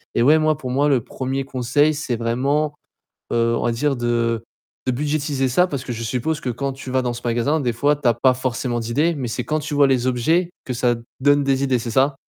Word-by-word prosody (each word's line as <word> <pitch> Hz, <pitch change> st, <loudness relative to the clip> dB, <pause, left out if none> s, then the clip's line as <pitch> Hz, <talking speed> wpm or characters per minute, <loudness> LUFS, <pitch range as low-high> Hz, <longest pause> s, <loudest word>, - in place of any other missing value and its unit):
et 115 Hz, -, +3 dB
ouais, 150 Hz, +5 st, +6 dB
moi, 155 Hz, -1 st, +2 dB
pour 130 Hz, -4 st, -6 dB
moi, 140 Hz, +3 st, +2 dB
le 130 Hz, -5 st, +2 dB
1ᵉʳ 135 Hz, +3 st, -3 dB
conseil, 135 Hz, +4 st, +1 dB
c'est 145 Hz, -5 st, -2 dB
vraiment, 140 Hz, +6 st, 0 dB, 0.6 s
heu, 115 Hz, 0 st, +2 dB
on -, -, -2 dB
va 120 Hz, -, +2 dB
dire 140 Hz, +4 st, 0 dB
de, 120 Hz, -1 st, -3 dB
heu, 115 Hz, -1 st, 0 dB, 0.4 s
de -, -, +3 dB
budgétiser 145 Hz, 0 st, -1 dB
ça. 180 Hz, +9 st, +4 dB
Parce 140 Hz, -7 st, -4 dB
que -, -, -6 dB
je 115 Hz, 0 st, -5 dB
suppose 130 Hz, +7 st, -1 dB
que 130 Hz, -, -3 dB
quand 135 Hz, +3 st, -3 dB
tu 135 Hz, -1 st, -8 dB
vas 130 Hz, 0 st, +2 dB
dans 120 Hz, -1 st, -1 dB
ce 120 Hz, -, -8 dB
magasin, 120 Hz, +7 st, +1 dB
des 120 Hz, -3 st, 0 dB
fois, 145 Hz, +6 st, +2 dB
tu 145 Hz, -3 st, -2 dB
as 120 Hz, -, +5 dB
pas 130 Hz, +2 st, +3 dB
forcément 125 Hz, -1 st, -2 dB
d'idées, 145 Hz, +9 st, 0 dB
mais 130 Hz, -4 st, -3 dB
c'est 120 Hz, +2 st, -3 dB
quand 155 Hz, -, -1 dB
tu 150 Hz, 0 st, -5 dB
vois 145 Hz, -1 st, +5 dB
les 130 Hz, -2 st, +1 dB
objets 160 Hz, +8 st, +1 dB
que 130 Hz, -, -3 dB
ça 120 Hz, 0 st, +2 dB, 0.3 s
donne 145 Hz, +1 st, +4 dB
des 135 Hz, 0 st, +1 dB
idées, 130 Hz, -3 st, +1 dB
c'est 115 Hz, 0 st, -5 dB
ça? 135 Hz, +4 st, +2 dB
130 Hz, 250 wpm, -21 LUFS, 120-145 Hz, 0.6 s, ouais